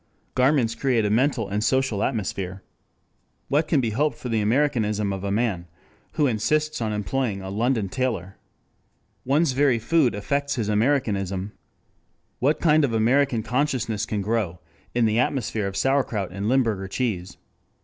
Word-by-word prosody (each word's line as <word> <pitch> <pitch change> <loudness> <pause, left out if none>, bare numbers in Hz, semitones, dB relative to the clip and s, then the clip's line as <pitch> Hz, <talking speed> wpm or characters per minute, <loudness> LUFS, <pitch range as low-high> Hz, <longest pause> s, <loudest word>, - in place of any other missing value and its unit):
Garments 130 -3 +3
create 115 -2 +1
a 105 - 0
mental 120 -1 +1
and 105 +2 -1
social 130 -3 +1
atmosphere. 95 -5 -3 0.9
What 150 +3 +2
can 150 -5 +2
be 115 -3 -1
hoped 145 +7 0
for 125 - -6
the 110 -2 +1
Americanism 105 -4 +1
of 95 0 -5
a 100 - -2
man 100 -5 -1 0.5
who 150 - +2
insists 150 +5 0
on 110 -1 -1
employing 105 -1 -2
a 95 - -6
London 110 0 0
tailor? 110 -6 -2 0.9
One's 140 +3 +2
very 135 -2 +3
food 125 +1 +2
affects 140 +7 -1
his 110 -5 -2
Americanism. 105 -5 0 0.9
What 145 +4 +2
kind 155 -2 +4
of 130 -5 +1
American 120 +1 +2
consciousness 120 -4 -1
can 105 -2 -2
grow 100 -5 -1 0.4
in 120 -1 +3
the 110 +1 +2
atmosphere 115 -5 0
of 100 - -5
sauerkraut 130 -8 0
and 100 +3 -3
Limburger 115 -7 +1
cheese? 95 -5 -3
115 Hz, 150 wpm, -24 LUFS, 105-135 Hz, 0.9 s, kind